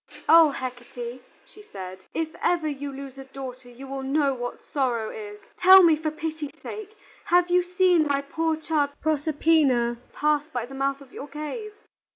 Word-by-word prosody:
"O 325 -1 +8
Hecate," 245 -2 -6 0.2
she 420 - -16
said, 185 - -9
"if 325 -1 -1
ever 335 -3 +1
you 285 -1 -4
lose 275 0 -9
a - - -7
daughter 260 -2 -9
you 245 +3 -11
will 270 0 -5
know 275 +1 +1
what 245 -1 -5
sorrow 245 -6 -1
is. 210 -1 -8 0.2
Tell 375 +1 +9
me, 330 -2 +6
for 310 +1 -2
pity's 310 -1 -5
sake, 430 0 -8 0.3
have 355 0 +3
you 360 0 +5
seen 360 -3 +3
my 280 -1 0
poor 320 +3 -1
child 310 -2 0
Proserpina 295 -5 +2
pass 300 0 +1
by 245 -7 -4
the 265 - -12
mouth 275 +1 -1
of 270 -2 -16
your 285 - -7
cave?" 305 - -6
285 Hz, 175 wpm, -25 LUFS, 260-320 Hz, 0.3 s, Tell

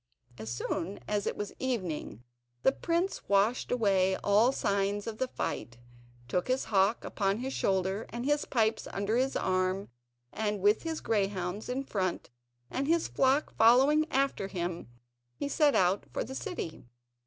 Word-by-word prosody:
As 110 +1 -5
soon 165 +10 -3
as 205 -1 -1
it - - -2
was 205 - -4
evening, 185 - -3 0.4
the - - +6
prince 340 +6 -2
washed 200 +5 +2
away 195 -6 +3
all 210 +5 +4
signs 200 -4 0
of 220 -1 -6
the 260 - +1
fight, 120 - -4 0.5
took 180 +7 -1
his 255 +1 +1
hawk 200 +2 +2
upon 195 -1 0
his 260 +3 -4
shoulder, 190 +2 0
and 240 +2 -5
his 295 +1 +1
pipes 225 -2 +1
under 200 +3 0
his 260 +2 +1
arm, 185 +1 0 0.4
and 210 -1 -1
with 205 +3 +3
his 325 -1 -4
greyhounds 195 -1 -1
in 260 +2 -1
front 185 - -2 0.4
and 275 +1 -1
his 335 +1 +2
flock 270 +3 +2
following 270 +7 +5
after 270 -7 0
him 175 -3 -4 0.5
he 280 - -3
set 290 0 +3
out 185 +2 +2
for - - -2
the 260 - -7
city. 265 - -5
210 Hz, 155 wpm, -30 LUFS, 190-260 Hz, 0.5 s, the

